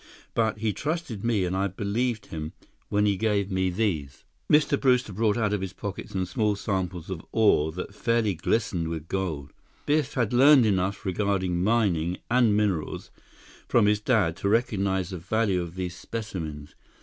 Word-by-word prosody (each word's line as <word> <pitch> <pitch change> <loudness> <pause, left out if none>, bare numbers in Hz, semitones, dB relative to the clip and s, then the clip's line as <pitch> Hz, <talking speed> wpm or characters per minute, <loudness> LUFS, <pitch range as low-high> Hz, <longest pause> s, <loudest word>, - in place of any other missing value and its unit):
But 110 -2 +1
he 110 -1 -1
trusted 150 - -3
me 110 -5 +1
and 90 +1 -2
I 100 +1 +1
believed 105 +4 -2
him—when 80 +6 -4
he 100 -2 +2
gave 105 -2 0
me 95 0 +1
these." 85 -9 -2 0.3
Mr. 150 -1 +4
Brewster 125 -5 +2
brought 110 +2 +1
out 105 -3 +1
of 105 - -1
his 95 0 -4
pocket 100 0 -6
some 95 -1 -2
small 105 +3 0
samples 95 -3 -3
of 85 -3 -5
ore 100 -8 +3
that 90 +3 -6
fairly 115 -1 +1
glistened 90 -1 -1
with 80 -1 -5
gold. 80 -8 -3 0.3
Biff 150 -1 +1
had 120 -4 0
learned 135 0 +7
enough 100 +1 0
regarding 95 -2 0
mining 95 -6 +1
and 120 -4 +4
minerals 100 -7 -1 0.6
from - - +4
his 105 0 +3
dad 105 -7 +2
to 100 +1 -1
recognize 100 -5 +1
the 90 - -5
value 100 +1 0
of 85 0 -7
these 90 -2 -4
specimens. 85 -8 -6
100 Hz, 165 wpm, -26 LUFS, 90-110 Hz, 0.6 s, learned